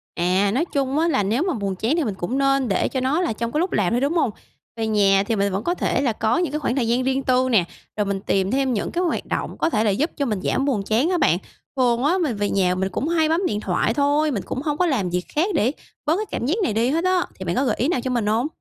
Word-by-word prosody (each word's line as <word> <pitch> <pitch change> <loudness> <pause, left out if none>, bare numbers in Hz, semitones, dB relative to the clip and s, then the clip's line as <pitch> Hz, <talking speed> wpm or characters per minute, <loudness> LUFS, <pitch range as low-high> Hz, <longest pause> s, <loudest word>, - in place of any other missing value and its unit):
À, 185 +3 +2
nói 280 +8 +1
chung 275 +1 0
á 330 - +2
là 265 -11 +1
nếu 230 - 0
mà 370 - 0
buồn 200 -5 -3
chán 225 +10 0
thì 335 - +1
mình 210 -7 -2
cũng 190 +9 -3
nên 275 -2 +2
để 195 - +1
cho 260 - -2
nó 270 +7 +1
là 345 - 0
trong 230 +2 -3
cái 300 - 0
lúc 360 +3 0
làm 205 +1 +1
thôi, 245 - +1
đúng 285 +4 +1
hông? 330 -8 +2 0.5
Về 225 -1 -2
nhà 200 -2 +3
thì 225 - -1
mình 200 -1 0
vẫn 195 +3 -2
có 350 - 0
thể 265 - 0
là 255 -5 +1
có 220 +7 0
những 345 -5 0
cái 300 - -2
khoảng 260 -4 -1
thời 245 -4 0
gian 245 +2 +1
riêng 265 +1 0
tư 255 0 +2
nè, 200 -7 +4 0.3
rồi 210 - +1
mình 195 -1 -2
tìm 195 -1 0
thêm 265 -1 +1
những 205 - -2
cái 355 - -1
hoạt 345 - -1
động - - -3
có 330 - +1
thể 215 -7 +1
là 220 - +2
giúp 280 - 0
cho 280 - 0
mình 215 -6 -1
giảm 270 - 0
buồn 245 -8 0
chán 225 - +1
á 365 - +1
bạn. - - +3 0.4
Thường 245 -1 +2
á, 335 +6 +3
mình 305 -10 0
về 205 0 -1
nhà 185 -2 +1
mình 190 +1 -1
cũng 230 +10 -3
hay 320 -2 +2
bấm 335 +4 +1
điện 210 -10 -1
thoại 200 +3 0
thôi, 290 +2 +2
mình 205 -6 -2
cũng 260 - -4
hông 295 -1 -2
có 360 - +2
làm 240 - 0
việc 180 +1 -2
khác 340 +7 +2
để 240 +1 +2 0.3
bớt 310 - +2
cái 430 - -2
cảm - - -2
giác 310 +9 +1
này 220 - 0
đi 230 +3 +1
hết 325 +5 0
á. 370 -1 +2
Thì 190 - -8
bạn 175 - -1
có 270 - +1
gợi 230 - +1
ý 255 - 0
nào 290 -7 0
cho 255 +1 -3
mình 235 -4 0
hông? 225 +6 +1
255 Hz, 315 wpm, -22 LUFS, 210-300 Hz, 0.5 s, nè